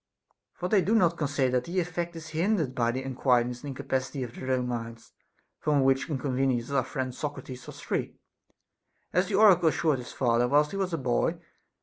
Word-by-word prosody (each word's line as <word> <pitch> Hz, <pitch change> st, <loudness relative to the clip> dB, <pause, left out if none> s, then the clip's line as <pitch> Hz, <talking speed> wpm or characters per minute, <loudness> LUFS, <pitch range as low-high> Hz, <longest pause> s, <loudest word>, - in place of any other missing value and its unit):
For 180 Hz, -, -3 dB
they 195 Hz, 0 st, +4 dB
do 215 Hz, +5 st, +1 dB
not 175 Hz, -6 st, +4 dB
con 150 Hz, -3 st, -1 dB
sider 135 Hz, -2 st, +1 dB
that 125 Hz, -, -2 dB
the 180 Hz, +2 st, -1 dB
effect 175 Hz, 0 st, -3 dB
is 160 Hz, -1 st, -8 dB
hindered 165 Hz, -, 0 dB
by 120 Hz, -2 st, +1 dB
the 130 Hz, +2 st, -2 dB
unquietness 125 Hz, -2 st, +1 dB
and -, -, -8 dB
incapacity 130 Hz, 0 st, -3 dB
of 120 Hz, -2 st, -7 dB
their 130 Hz, -, -7 dB
own 125 Hz, -1 st, +1 dB
minds; 115 Hz, -1 st, -6 dB, 0.5 s
from 145 Hz, -3 st, +2 dB
which 135 Hz, +2 st, +2 dB
inconveniences 130 Hz, -3 st, -1 dB
our 140 Hz, -2 st, +2 dB
friend 130 Hz, -1 st, -4 dB
Socrates 135 Hz, -2 st, -6 dB
was -, -, -10 dB
free, -, -, -2 dB, 1.0 s
as 180 Hz, +2 st, +2 dB
the 205 Hz, -, -1 dB
oracle 190 Hz, -5 st, +6 dB
assured 155 Hz, -3 st, +1 dB
his 125 Hz, -, -8 dB
father 120 Hz, -1 st, +2 dB
whilst 150 Hz, +3 st, +3 dB
he 195 Hz, -, -4 dB
was 190 Hz, -2 st, -1 dB
a 165 Hz, -, -1 dB
boy. 130 Hz, +5 st, 0 dB
135 Hz, 200 wpm, -28 LUFS, 125-165 Hz, 1.0 s, oracle